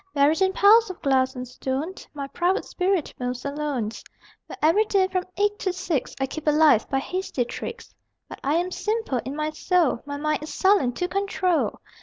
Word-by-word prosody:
Buried 290 +5 +3
in 380 0 +4
piles 425 +3 +6
of 370 - -7
glass 260 -1 +2
and 250 0 -5
stone 265 +7 -3 0.2
My 280 -1 -4
private 350 +6 0
spirit 365 -3 -1
moves 250 +1 -4
alone, 280 -6 -2 0.6
Where - - -9
every 335 +8 +4
day 390 -3 +2
from 370 -1 -2
eight 415 +1 +1
to 375 - 0
six 345 -6 -2
I 270 - +1
keep 310 +3 -7
alive 300 -6 +4
by 270 - +1
hasty 275 -3 -2
tricks. 465 - -7 0.3
But - - -10
I 285 +3 +1
am 355 +2 0
simple 425 - -1
in 270 +2 -5
my 305 0 -2
soul; 325 -4 +1
My 285 0 -4
mind 305 +1 -1
is 305 - -7
sullen 380 -11 +3
to 355 +9 -2
control. 375 -3 0
315 Hz, 190 wpm, -24 LUFS, 275-375 Hz, 0.6 s, piles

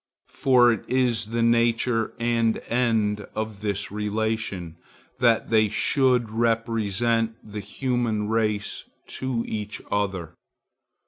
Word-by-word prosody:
For 125 -2 +4
it 110 - -2
is 120 -4 +1
the 115 +1 -1
nature 115 0 +2
and 115 -1 +1
end 110 -4 +1
of 110 -1 -4
this 100 -2 -2
relation, 105 -5 -2 0.4
that 120 -2 +2
they 110 -1 +4
should 125 0 +2
represent 115 0 0
the 105 -1 -7
human 120 -2 -1
race 105 -2 -1 0.4
to 130 -3 -2
each 105 -1 -4
other. 95 -5 -1
115 Hz, 110 wpm, -25 LUFS, 105-120 Hz, 0.4 s, For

